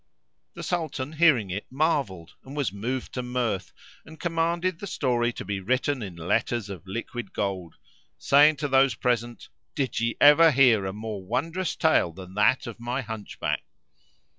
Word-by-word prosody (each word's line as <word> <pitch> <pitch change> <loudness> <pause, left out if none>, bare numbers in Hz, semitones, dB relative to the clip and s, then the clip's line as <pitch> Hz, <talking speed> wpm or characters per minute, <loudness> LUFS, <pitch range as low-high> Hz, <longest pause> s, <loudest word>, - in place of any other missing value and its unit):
The - - -7
Sultan 155 -5 -3
hearing 150 - +3
it 100 +3 -4
marvelled 135 - -1
and 135 +3 -10
was 135 -10 -1
moved 120 +6 -4
to 125 - -2
mirth 125 -5 -2 0.3
and 160 +1 -14
commanded 170 +1 -1
the 200 - -6
story 120 -8 0
to - - -7
be 100 0 -3
written 130 +6 0
in 95 -5 -6
letters 100 +6 -1
of 95 -1 -9
liquid 115 +4 -6
gold, 95 -4 -3 0.4
saying 145 +2 +5
to 145 +1 -3
those 135 -1 +3
present, 120 -1 -2 0.3
"Did 135 -5 -1
ye 115 0 -1
ever 150 +3 +8
hear 125 -8 +4
a - - -3
more 105 -1 -6
wondrous 165 - -2
tale 155 - +2
than 90 +2 -11
that 105 +7 +3
of 120 -2 -8
my 120 +3 -2
Hunchback?" 110 -2 -4
125 Hz, 165 wpm, -26 LUFS, 105-145 Hz, 0.4 s, ever